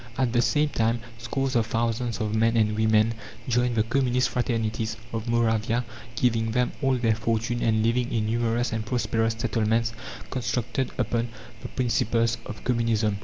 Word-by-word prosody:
At 130 -3 +1
the 120 - +4
same 150 +3 +2
time 115 -2 +1 0.2
scores 135 +3 -2
of 115 -2 +2
thousands 115 0 -1
of 110 -1 -1
men 115 +1 +3
and 105 -1 +2
women 110 +1 +3 0.3
joined 125 0 +1
the 110 - +3
communist 125 +1 +1
fraternities 115 -2 -1 0.2
of 115 +1 -3
Moravia, 115 0 +1 0.3
giving 115 -1 +1
them 125 0 +1
all 135 -2 +3
their 115 -3 +2
fortune 115 +1 -1
and 110 -1 +2
living 120 +1 +1
in 110 -2 0
numerous 115 +1 0
and 110 -1 -1
prosperous 115 -1 0
settlements 115 0 +1 0.4
constructed 125 0 -1
upon 120 -1 0 0.3
the - - -5
principles 115 -2 +1
of 105 - -8
communism. 115 -4 +1
115 Hz, 160 wpm, -26 LUFS, 110-120 Hz, 0.4 s, the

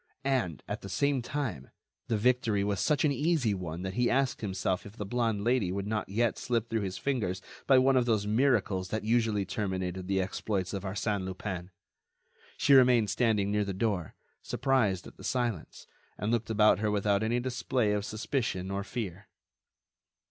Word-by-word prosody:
And, 125 - 0
at - - -4
the 100 - -8
same 135 +8 +1
time, 120 - -4 0.4
the 110 - +1
victory 115 -3 +2
was 100 -1 -1
such 150 0 +2
an 150 - +3
easy 145 -5 +1
one 90 -2 -5
that 95 0 -3
he 125 +2 +2
asked 135 0 +1
himself 95 -3 -1
if 105 +2 -12
the 105 - -4
blonde 115 -1 0
Lady 120 -6 +2
would 100 +1 -3
not 105 -1 -2
yet 115 +4 0
slip 115 -2 -1
through 115 -1 +1
his 95 -2 -3
fingers 105 -10 -1 0.3
by 135 - +6
one 130 +1 +4
of 125 -1 +3
those 110 -3 +2
miracles 105 -5 +1
that 110 +2 -2
usually 110 -3 +1
terminated 95 -2 -3
the 95 0 +1
exploits 95 0 -2
of 100 - -3
Arsène 100 +1 -2
Lupin. 95 -1 -5 0.9
She 140 - +4
remained 125 -6 +6
standing 105 -3 +1
near 105 0 +2
the 100 -2 -4
door, 95 -5 -1 0.3
surprised 125 -9 +1
at - - -13
the - - -12
silence, 120 -9 -2 0.3
and 105 +3 -1
looked 115 -1 0
about 105 -3 +4
her 105 0 0
without 100 -1 +1
any 115 +2 +1
display 125 -2 0
of 105 -1 0
suspicion 110 -3 -2
or 100 0 -2
fear. 100 -4 -5
105 Hz, 180 wpm, -30 LUFS, 95-120 Hz, 0.9 s, by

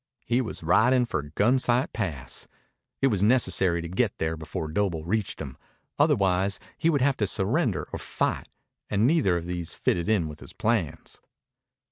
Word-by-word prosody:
He 120 +2 +2
was 110 -8 -6
riding 125 +9 +4
for 95 - -2
Gunsight 125 +3 +2
Pass. 75 - -4 0.6
It 135 - +5
was 100 -6 0
necessary 95 -7 +3
to - - -4
get 95 +5 0
there 80 0 -1
before 80 0 -5
Doble 85 -3 -1
reached 105 +3 -1
him. 70 -4 -7 0.4
Otherwise 100 - +2 0.2
he 165 - +1
would 145 -5 +2
have 135 0 +2
to 105 - 0
surrender 110 - +1
or - - -3
fight, - - -2 0.4
and 105 +2 +2
neither 130 - +3
of 85 - -5
these 85 -1 -4
fitted 85 +3 0
in 100 -7 +2
with 75 -1 -9
his - - -11
plans. 105 -9 -2
100 Hz, 165 wpm, -26 LUFS, 85-125 Hz, 0.6 s, It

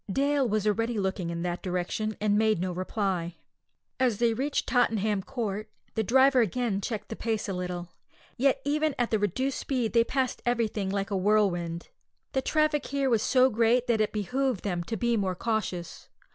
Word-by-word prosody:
Dale 280 +2 +2
was 215 0 0
already 225 +2 0
looking 190 -3 -1
in 170 0 -3
that 175 0 -2
direction, 185 +4 -2
and 210 -1 +2
made 215 -3 +3
no 185 +1 -1
reply. 185 -2 -2 0.6
As 250 -5 +2
they 235 0 +2
reached 275 +5 -1
Tottenham 220 -5 +1
Court 215 -2 -4
Road - - -41
the 220 - 0
driver 260 +4 +5
again 220 -1 0
checked 215 +1 -4
the 225 - -4
pace 220 -2 -2
a 195 - -2
little; 180 -1 -4 0.5
yet 270 +1 +2
even 300 0 +1
at 240 -1 0
the 220 - +2
reduced 255 +7 -1
speed 250 -5 -1
they 230 -1 +5
passed 260 +2 -1
everything 225 -5 0
like 195 +1 -2
a - - 0
whirlwind. 185 -4 +1 0.4
The 265 - 0
traffic 305 0 +1
here 275 -2 0
was 225 -3 +3
so 255 +2 +4
great 235 +2 +3
that 235 -3 +2
it 215 - +1
behoved 245 +2 -1
them 175 -4 -2
to 225 +3 -3
be 235 +2 +1
more 190 -3 0
cautious. 190 -5 -3
220 Hz, 185 wpm, -28 LUFS, 195-250 Hz, 0.6 s, driver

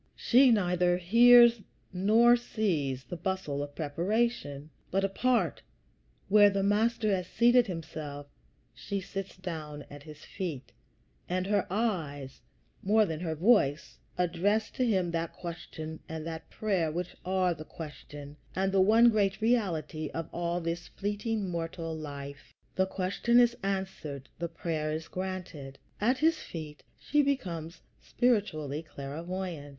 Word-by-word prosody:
She 255 +2 +5
neither 180 -5 +2
hears 235 +5 +7 0.3
nor 220 +6 +5
sees 165 - -1
the 135 - -7
bustle 185 -6 -3
of 145 0 -6
preparation; 160 -2 -1 0.2
but 195 +1 0
apart, 195 - +1 0.7
where 205 0 +7
the 195 -1 -1
Master 215 +1 +2
has 185 -1 -4
seated 240 +1 +4
himself, 155 -5 -6 0.5
she 200 - -4
sits 195 0 -6
down 155 -6 -6
at 145 0 -10
his 150 0 -12
feet, 165 -9 -5 0.6
and 185 +1 0
her 200 0 +1
eyes, 160 - -2 0.4
more 215 +2 +4
than 160 -4 -4
her 160 -2 -3
voice, 165 - +2 0.2
address 180 +5 +1
to 255 - 0
him 185 -6 +1
that 165 0 -2
question 160 -2 -7
and 160 -1 -5
that 160 0 -6
prayer 190 -7 0
which 175 +2 -4
are 185 -1 +1
the 155 -1 -9
question 145 -2 -10 0.2
and 195 +1 +1
the 195 -1 +4
one 225 +4 +6
great 200 -3 +1
reality 170 -10 0
of 165 -1 -3
all 170 0 -1
this 170 0 -4
fleeting, 205 +1 -3
mortal 165 -1 -4
life. 140 -2 -8 0.2
The 190 0 +1
question 195 +6 +2
is 240 -1 +4
answered; 190 -9 -4
the 170 0 -2
prayer 160 -2 -3
is 160 +1 -4
granted. 180 -8 -6 0.2
At 245 +5 +2
his 320 +3 +2
feet 155 -3 -8 0.2
she 295 - +2
becomes 180 - -3 0.2
spiritually 160 - 0
clairvoyant. 160 +2 -6
180 Hz, 135 wpm, -30 LUFS, 155-210 Hz, 0.7 s, hears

